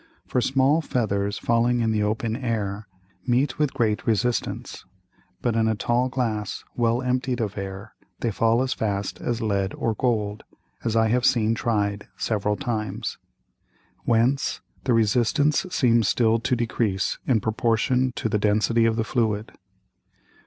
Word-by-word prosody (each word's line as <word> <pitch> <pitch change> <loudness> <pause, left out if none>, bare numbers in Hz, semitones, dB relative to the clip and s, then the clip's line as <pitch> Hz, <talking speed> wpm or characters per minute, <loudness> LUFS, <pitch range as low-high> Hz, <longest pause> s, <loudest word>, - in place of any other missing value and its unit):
For 125 - 0
small 135 +5 +3
Feathers 100 -8 -1
falling 120 +1 +2
in 110 -1 +1
the 110 -1 +1
open 110 +2 -1
Air 110 -5 -3 0.4
meet 130 +3 +1
with 150 -3 +2
great 110 -3 0
Resistance, 115 +1 -1 0.6
but 120 -2 +1
in 110 -1 +2
a 110 - +1
tall 120 +4 +1
Glass 115 -5 -2
well 120 +1 +1
emptied 125 0 0
of 105 -3 -2
Air, 100 +2 -6 0.3
they 115 - 0
fall 115 +4 +2
as 130 - -1
fast 100 -2 -3
as 120 -1 -2
Lead 100 -2 0
or 115 - -1
Gold, 105 -3 -1 0.4
as 115 -1 -1
I 110 -1 +3
have 125 +2 +2
seen 115 -3 +3
tried 105 -3 -1
several 105 -1 0
times. 110 -6 -3 0.8
Whence 120 +4 +1 0.3
the 125 - +3
Resistance 125 - +2
seems 120 - +3
still 115 +1 +3
to 125 - 0
decrease 110 -6 -1
in 125 -4 +3
proportion 115 +4 +1
to - - -1
the 105 -1 0
Density 110 +3 +2
of 115 -1 +2
the 115 - 0
Fluid. 110 -2 -1
115 Hz, 150 wpm, -24 LUFS, 105-125 Hz, 0.8 s, small